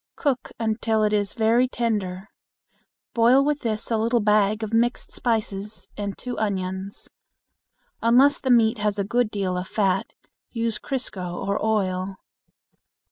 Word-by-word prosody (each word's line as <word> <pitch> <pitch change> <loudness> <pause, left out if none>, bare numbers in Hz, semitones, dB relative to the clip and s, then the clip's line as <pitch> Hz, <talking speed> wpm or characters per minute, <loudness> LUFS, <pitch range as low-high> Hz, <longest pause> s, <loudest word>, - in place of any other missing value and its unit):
Cook 270 -5 -1
until 220 -1 0
it 210 0 +2
is 205 -1 0
very 235 +2 +3
tender. 210 -6 -2 0.8
Boil 245 +4 +5
with 295 0 +1
this 220 -2 -3
a 225 - +2
little 235 +2 +2
bag 210 0 +2
of 220 +1 -4
mixed 240 +2 +1
spices 215 -3 -3
and 205 -1 -4
two 250 -1 -5
onions. 190 -2 -3 0.9
Unless 255 +5 +5
the 260 - -3
meat 230 -2 +4
has 210 0 0
a 200 - 0
good 240 +3 +1
deal 195 -3 -2
of 180 +1 -4
fat, 195 -3 0 0.3
use 230 -2 -2
crisco, 195 -8 -4
or 200 +1 -1
oil. 190 -3 0
215 Hz, 140 wpm, -24 LUFS, 200-235 Hz, 0.9 s, Boil